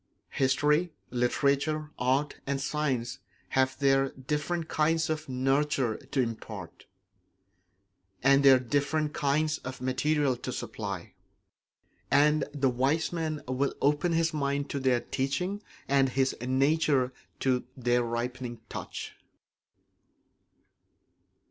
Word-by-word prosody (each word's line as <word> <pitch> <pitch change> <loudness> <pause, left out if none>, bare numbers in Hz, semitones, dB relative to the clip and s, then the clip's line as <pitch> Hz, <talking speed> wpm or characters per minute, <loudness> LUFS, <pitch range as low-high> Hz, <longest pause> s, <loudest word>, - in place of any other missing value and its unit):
History, 150 +5 +2 0.2
literature, 140 +5 +1
art, 135 +4 +1
and 140 0 0
science 135 -4 -1 0.3
have 130 0 +1
their 135 -1 +3
different 150 +6 -3
kinds 160 +1 +1
of 155 -2 -4
nurture 135 -2 +1
to 140 - -4
impart, 110 -6 -4 1.4
and 140 +1 +5
their 135 -1 +8
different 145 +4 0
kinds 150 +2 +1
of 130 +1 -7
material 135 +2 +1
to 130 - -5
supply; 100 -7 -5 1.0
and 150 +1 +4
the 135 -3 +1
wise 135 +8 +1
man 155 -3 -2
will 130 +2 0
open 150 +4 +2
his 165 0 +1
mind 140 -1 -1
to 140 - -2
their 130 -2 +2
teaching 180 +10 -2 0.3
and 135 -1 +3
his 130 +1 +1
nature 135 0 +2 0.3
to 130 -2 +1
their 120 -1 +2
ripening 120 +1 -3
touch. - - -6
140 Hz, 110 wpm, -29 LUFS, 130-150 Hz, 1.4 s, their